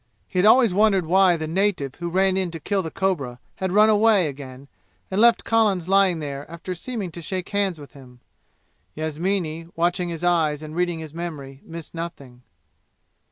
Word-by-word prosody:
He 185 - -2
had 190 - +5
always 230 -3 +5
wondered 200 -3 +3
why 185 +1 +4
the 160 - -4
native 165 -5 0
who 175 -1 -4
ran 190 +2 +2
in 190 -2 0
to 165 -1 -7
kill 195 +5 -1
the 165 - -5
cobra 150 -11 -2 0.2
had 190 -1 -2
run 210 +3 +5
away 215 -3 +4
again 135 -1 -9 0.4
and 190 +3 +1
left 235 0 +5
Collins 210 -6 +1
lying 195 -2 +3
there 145 -2 -6
after 170 +2 -6
seeming 195 0 -5
to 170 - -8
shake 185 +2 -4
hands 200 -5 -1
with 145 0 -12
him. 125 -3 -15 0.8
Yasmini, 165 +1 -2
watching 175 +1 0
his 165 0 -6
eyes 160 -4 +1
and 155 0 -8
reading 175 -1 0
his 160 -2 -8
memory, 150 -6 -7
missed 165 -1 -9
nothing. 140 -7 -8
175 Hz, 180 wpm, -23 LUFS, 155-195 Hz, 0.8 s, had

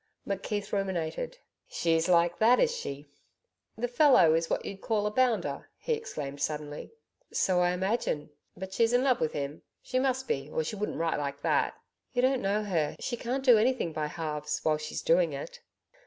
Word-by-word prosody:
McKeith 200 +1 -3
ruminated. 195 - -2 0.3
'SHE'S 165 0 +1
like 170 -1 +3
that, 235 +3 +5
is 475 -1 +3
she?... 145 - -6 0.7
The 245 +2 -1
fellow 245 - +5
is 165 0 +1
what - - -1
you'd 195 -1 -6
call 215 -2 0
a 210 - 0
bounder?' 250 -1 0
he 480 - -1
exclaimed 145 - -5
suddenly. 150 -1 -3 0.4
'So 185 -2 +2
I 175 0 +3
imagine.' 180 -5 -1 0.3
'But 190 +1 -7
she's 230 +3 +2
in 245 +1 +4
love 260 -3 +2
with 155 - 0
him 145 +1 -4 0.2
she 255 - 0
must 260 0 0
be, 135 +1 -2
or 160 - -1
she 185 - -4
wouldn't 210 +1 -3
write 165 -2 0
like 140 0 -4
that?' - - +1 0.4
'You 245 -1 +1
don't 260 0 +3
know 205 +2 0
her. 165 -7 0
She 240 - -2
can't 255 +3 -3
do 240 -4 +7
anything 230 -8 +1
by 155 -1 -2
halves 150 -2 -3
while 155 -1 +2
she's 155 0 -5
doing - - +3
it.' - - -7
195 Hz, 185 wpm, -29 LUFS, 155-245 Hz, 0.7 s, do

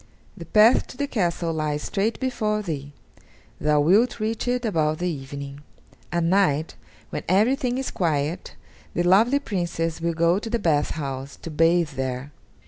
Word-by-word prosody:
The 170 -5 -10
path 215 +5 +5
to - - -12
the 285 - 0
castle 175 - -1
lies 150 -1 -2
straight 210 +3 -1
before 215 -5 -1
thee; 145 -6 -5 0.7
thou 150 -1 +3
wilt 210 +11 +3
reach 220 +2 -2
it 245 0 0
about 155 -7 +1
the 180 - -2
evening. 140 -2 -6 0.5
At 170 -1 0
night, 165 -4 +2 0.4
when - - -3
everything 245 +6 +2
is 265 - -3
quiet, 155 -1 -1 0.4
the 175 - +1
lovely 215 +10 +4
Princess 175 - -2
will 170 0 -1
go 170 +3 +3
to 225 - -6
the 235 - +1
bath 155 -8 +1
house, 135 -2 -5
to 165 - -6
bathe 165 +1 +3
there. 130 +1 -4
170 Hz, 160 wpm, -24 LUFS, 150-215 Hz, 0.7 s, path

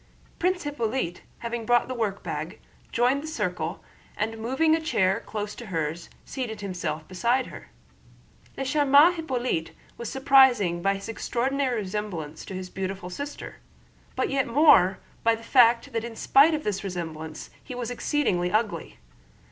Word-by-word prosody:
Prince 365 +1 +1
Hippolyte, 235 -10 -2 0.2
having 235 0 -4
brought 240 +1 +3
the 255 - -3
workbag, 200 -7 -3 0.3
joined 250 +4 +2
the 310 - -7
circle 180 - -3 0.3
and 225 +1 -2
moving 265 +8 +2
a 325 - -2
chair 190 - +1
close 210 -1 -4
to 240 - -9
hers 165 -2 -3 0.2
seated 225 -6 -5
himself 170 -5 -4
beside 235 +8 +1
her. - - -11 0.9
Le 270 - -2
charmant 290 +4 +5
Hippolyte 255 - -2 0.3
was 235 -2 -4
surprising 260 -10 +4
by 195 +2 +2
his 195 - -7
extraordinary 255 +3 -1
resemblance 185 -6 -5
to 190 - -7
his 185 0 -6
beautiful 190 -1 -4
sister, 285 +9 -7 0.6
but - - 0
yet 270 -1 +1
more 230 - +5 0.3
by 230 0 +4
the 225 - -12
fact 240 +1 +4
that 225 -1 -1
in 235 -1 -6
spite 285 +7 +5
of 305 - -4
this 205 -2 -2
resemblance 160 -4 -6
he 250 - -7
was 245 -1 -4
exceedingly 235 - 0
ugly. 215 0 -1
230 Hz, 150 wpm, -26 LUFS, 185-265 Hz, 0.9 s, charmant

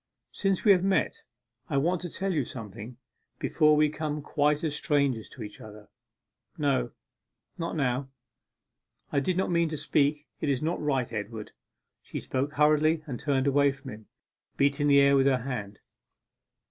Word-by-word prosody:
'Since 195 0 0
we 205 - +8
have 185 -2 +4
met, 195 0 +1 0.5
I 140 - 0
want 170 +5 +1
to 175 - -4
tell 195 +3 -2
you 150 -4 +1
something, 115 0 -8 0.4
before 155 -1 +3
we 150 0 +4
become 150 -1 -4
quite 150 0 +1
as 155 -2 -1
strangers 140 -7 0
to 120 - -9
each 105 -1 -10
other.' 105 -1 -12 0.7
'No 140 -5 +1 0.7
not 165 0 -3
now 135 -2 -1 1.0
I 140 - +2
did 180 +6 -1
not 190 - 0
mean 170 -1 +2
to 155 - -4
speak 150 0 +1
it 150 - -1
is 135 0 0
not 165 +3 -1
right, 135 -5 -1
Edward.' 105 0 -5 0.5
She - - -6
spoke 140 +3 -2
hurriedly 155 +2 +3
and 125 -6 -5
turned 140 -2 0
away 140 0 +4
from 135 -1 -10
him, 110 0 -11 0.5
beating 140 +1 +2
the 140 -1 +6
air 140 0 +5
with 135 0 +4
her 130 -3 +2
hand. 105 -6 -5
140 Hz, 170 wpm, -28 LUFS, 130-155 Hz, 1.0 s, we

